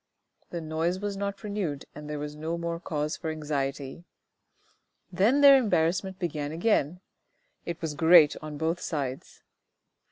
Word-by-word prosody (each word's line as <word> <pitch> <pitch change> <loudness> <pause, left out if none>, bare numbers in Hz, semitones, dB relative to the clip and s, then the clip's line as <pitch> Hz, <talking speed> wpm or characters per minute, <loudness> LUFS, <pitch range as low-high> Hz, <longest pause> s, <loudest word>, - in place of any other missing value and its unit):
The 170 - -5
noise 160 +3 -1
was 205 0 -3
not 200 +1 -4
renewed 195 -9 -3
and 150 0 -9
there 150 - -3
was 150 0 -5
no 160 +2 -3
more 170 0 -3
cause 150 -2 -2
for 160 - -5
anxiety. 145 -1 -3 1.1
Then 215 +10 +3
their 280 -1 +9
embarrassment 190 -4 +1
began 150 -5 -3
again; 175 -1 0 0.7
it 170 -1 -4
was 160 -2 -2
great 160 0 +6
on 155 -1 -7
both 165 +3 -1
sides. 140 -7 -5
160 Hz, 140 wpm, -27 LUFS, 150-180 Hz, 1.1 s, their